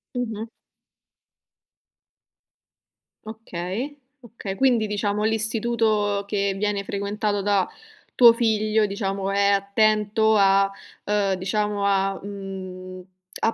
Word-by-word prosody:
Mh-mh. 225 -2 -3 2.8
Okay. 220 +4 -5 0.3
Okay. 210 -4 -7
Quindi, 240 -3 +2
diciamo, 210 0 -1
l'istituto 220 -2 0
che 200 -1 0
viene 205 0 -1
frequentato 205 +1 -2
da 200 -2 +1 0.5
tuo 235 -2 +8
figlio, 220 -2 +1
diciamo, 195 -1 -3
è 200 0 +3
attento 215 +2 +2
a 195 0 +4 0.4
uhm, 205 -2 +1
diciamo 205 +2 -1
a 195 -1 +1
mhmm, 185 -2 -8 0.4
a 225 - +3
205 Hz, 95 wpm, -23 LUFS, 195-220 Hz, 2.8 s, tuo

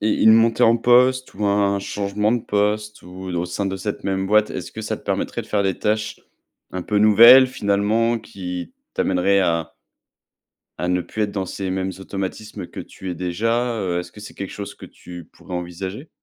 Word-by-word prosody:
et 110 +1 +1
une 110 - +6
montée 115 0 +4
en 115 +1 +6
poste 125 +2 +3
ou 105 +1 -3
un 100 0 +2
changement 105 +2 -1
de 120 - +1
poste 105 +1 -1
ou 90 +1 -10
au 85 - -1
sein 90 +3 -3
de 95 0 -2
cette 100 +2 -4
même 95 0 -1
boîte, 105 +1 +3
est - - -4
ce - - -11
que - - -7
ça - - -3
te - - -17
permettrait - - -2
de - - -15
faire 105 -1 0
des 95 -2 -1
tâches 110 0 -1 0.5
un 95 - -3
peu 105 +2 0
nouvelles 115 +5 +8
finalement 110 +1 +1
qui 90 -5 -7 0.2
t'amèneraient 100 +2 +2
à 85 -3 -1 1.1
à 90 - -1
ne 90 0 +1
plus 110 - -5
être 100 - -2
dans 95 -2 -3
ces 95 +1 -5
mêmes 95 0 -2
automatismes 95 +1 -5
que - - -9
tu 95 - -8
es - - -5
déjà? 115 +8 -1
Heu, 90 -3 -1
est - - -4
ce 90 - -14
que 105 - -14
c'est 105 - -10
quelque 100 - -6
chose 100 -1 -7
que - - -12
tu 90 -2 -11
pourrais 90 - -12
envisager? 95 - -5
100 Hz, 210 wpm, -21 LUFS, 95-110 Hz, 1.1 s, nouvelles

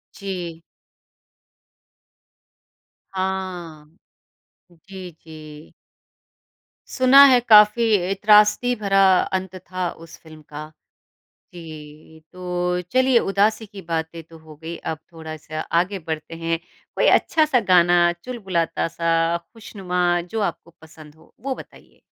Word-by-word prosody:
जी। 180 -4 -6 2.5
हाँ, 180 -5 -5 0.7
जी, 185 +1 -11
जी। 155 -1 -14 1.2
सुना 260 +2 +7
है 250 - +5
काफ़ी 210 +2 +6
अ, 180 +1 -2
त्रासदी 210 +4 +4
भरा 195 -3 +2 0.3
अंत 190 0 -8
था 185 -1 -5 0.2
उस 165 - -14
फ़िल्म 155 -1 -15
का। 150 +1 -10 0.8
जी, 155 -1 -12
तो 180 -1 -3
चलिए 255 -1 +4
उदासी 215 +2 0
की 200 -1 -12
बातें 165 0 -4
तो 165 +1 -16
हो 155 -1 -15
गई 165 +2 -8 0.2
अब 160 - -8
थोड़ा-सा 155 -1 -8
आगे 175 +5 -1
बढ़ते 160 -1 -6
हैं, 165 0 -2 0.4
कोई - - +2
अच्छा-सा 310 - +3
गाना, 175 -1 +4
चुलबुलाता-सा, 170 -6 -1
ख़ुशनुमा, 180 -3 -3
जो 180 +6 -5
आपको 170 - -22
पसंद 155 -2 -15
हो 160 +1 -24
वो 265 +3 -3
बताइए? - - -15
175 Hz, 110 wpm, -21 LUFS, 160-200 Hz, 2.5 s, सुना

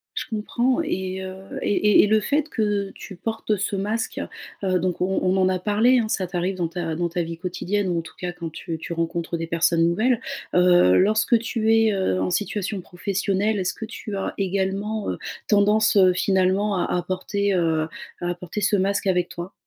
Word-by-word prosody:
Je - - -2
comprends, 240 +6 0
et 190 - -3
heu, 190 0 -6 0.3
et 205 - +1
et 210 -1 +5
et - - +3
le 215 +1 +4
fait 290 +7 0
que 205 -5 0
tu 195 - -9
portes 220 +2 -2
ce 200 +1 -2
masque, 210 +4 -2 0.4
heu, 185 -1 +2
donc, 180 -1 -1
on 190 +1 +1
on 185 +1 +2
en 185 -1 +3
a 185 -1 0
parlé, 220 +6 +3
hein, 225 - 0
ça 195 -3 -1
t'arrive 180 +1 -2
dans 175 -2 -1
ta 165 -1 -3
dans 175 +1 0
ta 175 +1 -2
vie 165 0 -5
quotidienne 185 +3 -2
ou, 175 -2 0
en - - -2
tout 165 - -13
cas, 180 -1 -3
quand 175 -2 -6
tu 160 +1 -6
tu 170 - -5
rencontres 170 0 -2
des 165 - -3
personnes 165 0 +2
nouvelles. 220 +8 +2 0.4
Heu, 175 - +5
lorsque 220 +4 +4
tu 225 -1 0
es, 225 -1 +4
heu, 190 - 0
en 95 0 -1
situation 205 - -2
professionnelle, 200 +3 -1
est-ce 180 -1 -1
que 225 - -6
tu 215 -2 -7
as 195 - -3
également, 195 +2 -1
heu, - - -4 0.3
tendance, 210 +1 +4
heu, 185 -2 +6
finalement, 190 +2 +2
à 175 - +1
à 175 - -2
porter, 200 +2 -1
heu, 160 -3 +1 0.3
à 175 - -2
apporter 175 +3 -4
ce 205 - +3
masque 200 +1 0
avec 180 -2 +1
toi? 175 +3 -7
190 Hz, 205 wpm, -23 LUFS, 175-210 Hz, 0.4 s, heu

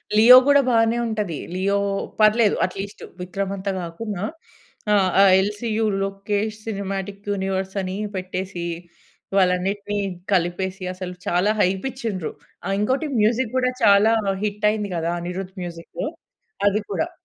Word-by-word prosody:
'Leo' 240 +4 +10
కూడా 285 0 +6
బానే 225 0 +3
ఉంటది. 210 -8 -2 0.2
'లియో' 195 +2 +1 0.4
పర్లేదు 215 0 +5
అట్లీస్టు. 195 +2 -7 0.2
విక్రమ్ 195 +2 -3
అంత 195 +1 -3
కాకున్నా 185 +3 -5 0.7
ఆహ్, 195 -2 +4
ఆ - - +8 0.2
ఎల్సీయూ 215 +3 -1 0.2
లోకేష్ 205 +2 -2
సినిమాటిక్ 200 -1 -4
యూనివర్స్ 190 0 -2
అని 185 0 -4 0.2
పెట్టేసి 185 -1 -4 0.7
వాళ్ళ 185 -2 +5
అన్నిటిని 205 +2 -3 0.4
కలిపేసి 185 +1 -1
అసలు 185 -1 -6
చాలా 180 +4 +2
హైప్ 190 +5 +1
ఇచ్చిండ్రు. 220 - -4 0.3
ఆ! - - -3
ఇంకోటి 260 +9 0
మ్యూజిక్ 230 +2 +1
కూడా 255 0 +2
చాలా 205 +2 +6 0.3
హిట్ 210 0 -2
అయింది 210 -2 -3
కదా! 165 +1 -1
అనిరుద్ 180 +2 -5
మ్యూజికు. 170 -1 -6 0.6
అది 205 +1 +2
కూడా. 180 -5 -1
200 Hz, 130 wpm, -22 LUFS, 185-215 Hz, 0.7 s, లియో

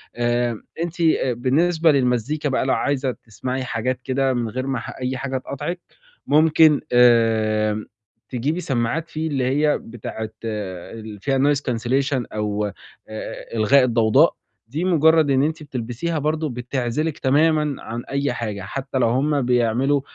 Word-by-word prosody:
آآ 120 -1 0 0.2
أنتِ 170 0 -5
آآ 155 -6 +2
بالنسبة 160 +7 +2
للمزيكا 135 +3 0
بقى 130 - 0
لو 135 - +2
عايزة 135 -2 0
تسمعي 125 +4 -5
حاجات 125 +1 -2
كده 135 0 +1
من 120 -2 -1
غير 130 +3 -4
ما 135 -3 -1
ح - - -7
أي 130 +1 -2
حاجة 130 +1 -3
تقاطعِك، 150 +7 -5 0.5
ممكن 155 0 +5
آآ 110 -3 +3 0.4
تجيبي 140 +8 -1
سماعات 145 +3 -1
في 160 +1 -3
اللي 135 -4 -1
هي 145 +3 +2
بتاعة 110 -1 -7 0.2
اللي 105 +1 -6
فيها 135 -1 +1
noise 145 +1 +3
cancellation 130 +1 -1
أو 105 -1 -1
آآ 110 +3 -9
إلغاء 125 +5 +5
الضوضاء، 120 +5 +4 0.3
دي 150 +8 -3
مُجرَّد 160 -3 +4
إن 135 +1 +3
أنتِ 155 0 -2
بتلبسيها 135 +5 -3
برضه 155 +1 -1
بتعزِلِك 125 +5 -2
تمامًا 150 +1 +2
عن 120 +1 -5
أي 140 -1 0
حاجة، 105 -4 -4
حتّى 135 +7 -4
لو 120 -3 +3
هم 140 +3 +1
بيعملوا 125 +3 +2
130 Hz, 145 wpm, -22 LUFS, 115-150 Hz, 0.5 s, ممكن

